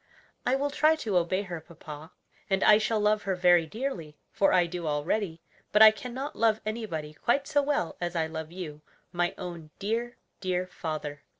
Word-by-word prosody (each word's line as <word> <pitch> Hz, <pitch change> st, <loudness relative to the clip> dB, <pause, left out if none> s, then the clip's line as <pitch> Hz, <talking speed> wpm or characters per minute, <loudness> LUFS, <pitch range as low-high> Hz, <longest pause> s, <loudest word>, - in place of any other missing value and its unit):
"I 255 Hz, -, +4 dB
will 285 Hz, +1 st, -1 dB
try 310 Hz, +2 st, +4 dB
to 220 Hz, -11 st, -3 dB
obey 180 Hz, +3 st, +2 dB
her, 175 Hz, -4 st, -6 dB
papa; 155 Hz, 0 st, -11 dB, 0.4 s
and 195 Hz, -1 st, +2 dB
I 210 Hz, 0 st, +7 dB
shall 220 Hz, 0 st, 0 dB
love 210 Hz, 0 st, +2 dB
her 195 Hz, -1 st, -1 dB
very 175 Hz, -2 st, +4 dB
dearly, 175 Hz, -, -5 dB
for 195 Hz, -, +3 dB
I 180 Hz, -1 st, +4 dB
do 170 Hz, -1 st, -5 dB
already; 160 Hz, +3 st, -1 dB, 0.3 s
but 210 Hz, +1 st, +7 dB
I 215 Hz, -, +11 dB
can 245 Hz, +3 st, -8 dB
not 270 Hz, +4 st, -5 dB
love 220 Hz, -1 st, +3 dB
anybody 195 Hz, -9 st, -4 dB
quite 275 Hz, -, +1 dB
so 290 Hz, -1 st, +3 dB
well 280 Hz, -, -1 dB
as 175 Hz, 0 st, -2 dB
I 165 Hz, -1 st, +1 dB
love 160 Hz, 0 st, -6 dB
you, 160 Hz, -5 st, -7 dB, 0.3 s
my 175 Hz, 0 st, 0 dB
own 170 Hz, -3 st, -7 dB
dear, 230 Hz, +4 st, -2 dB, 0.2 s
dear 185 Hz, -1 st, -1 dB
father!" 155 Hz, -5 st, -5 dB
185 Hz, 190 wpm, -28 LUFS, 165-220 Hz, 0.4 s, I